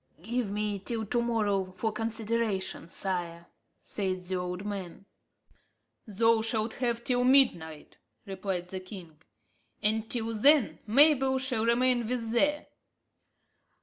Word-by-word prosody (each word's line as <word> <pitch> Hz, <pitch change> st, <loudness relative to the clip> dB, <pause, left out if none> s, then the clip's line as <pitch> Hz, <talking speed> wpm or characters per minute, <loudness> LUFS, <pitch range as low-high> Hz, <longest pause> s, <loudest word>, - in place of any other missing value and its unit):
"Give 235 Hz, +1 st, -2 dB
me 205 Hz, 0 st, -2 dB
till 220 Hz, +3 st, -3 dB
to 240 Hz, +3 st, 0 dB
morrow 210 Hz, -5 st, 0 dB
for 220 Hz, +4 st, -2 dB
consideration, 220 Hz, -4 st, -2 dB
sire," 175 Hz, -2 st, -2 dB, 0.4 s
said 185 Hz, -3 st, -3 dB
the 185 Hz, +1 st, -3 dB
old 180 Hz, +2 st, -4 dB
man. 195 Hz, -2 st, -6 dB, 1.0 s
"Thou 225 Hz, +2 st, +2 dB
shalt 220 Hz, 0 st, -1 dB
have 235 Hz, -1 st, -1 dB
till 245 Hz, 0 st, +1 dB
midnight," 240 Hz, -, +1 dB, 0.3 s
replied 190 Hz, -2 st, -4 dB
the 190 Hz, -, -5 dB
king; 180 Hz, -5 st, -12 dB, 0.6 s
"and 220 Hz, +1 st, +1 dB
till 230 Hz, -2 st, -1 dB
then 275 Hz, +3 st, +4 dB
Mabel 270 Hz, +2 st, +5 dB
shall 255 Hz, -4 st, -1 dB
remain 240 Hz, 0 st, +2 dB
with 230 Hz, -2 st, -3 dB
thee." 290 Hz, +6 st, +1 dB
220 Hz, 120 wpm, -28 LUFS, 190-235 Hz, 1.0 s, Mabel